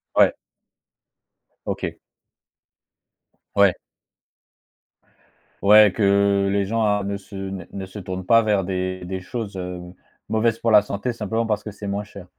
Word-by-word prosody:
Ouais. - - +5 1.3
OK. - - -3 1.6
Ouais. 100 -3 +5 1.9
Ouais 105 0 +7
que 100 -1 +3
les 100 0 +1
gens 115 +3 -1
a 105 -1 +2
ne 100 0 -3
se 100 +1 -14
ne 95 -2 -5
ne 95 -1 -6
se 95 +2 -9
tournent 95 -1 -6
pas 115 +4 +6
vers 105 -3 +1
des 95 0 -3
des 95 0 -4
choses, 105 +1 -6
heu, 90 -1 -5 0.5
mauvaises 110 +1 +1
pour 115 -1 0
la 105 -1 +8
santé 105 +4 -3
simplement 115 +1 -2
parce 105 -2 -1
que 105 - -6
c'est 105 0 -9
moins 100 +1 -2
cher? 100 -3 -12
100 Hz, 145 wpm, -22 LUFS, 95-105 Hz, 1.9 s, la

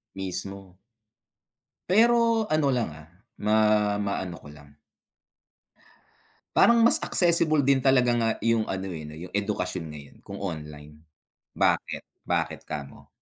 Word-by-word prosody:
Mismo. 95 0 -6 1.1
Pero 230 +2 +3
ano, 155 -2 +2
lang, 120 -7 -1
ah, 80 +1 -13 0.3
ma 105 +1 +1 0.4
maano 95 -3 -3
ko - - -13
lang. 75 0 -17 1.8
Parang, 235 0 +5
mas 235 - +5
accessible 165 -4 +2
din 140 0 +3
talaga 130 -2 +3
nga 115 -1 +1
yung 115 -1 +1
ano, 95 0 -4
eh, 80 -4 -7
'no, 75 - -10
'yung 85 +4 -10
edukasyon 100 -4 -2
ngayon 70 -2 -12
kung 100 0 -8
online. 75 -4 -7 0.6
Bakit? - - 0 0.2
Bakit - - -1
kamo? 70 -2 -8
100 Hz, 125 wpm, -26 LUFS, -, 1.8 s, Parang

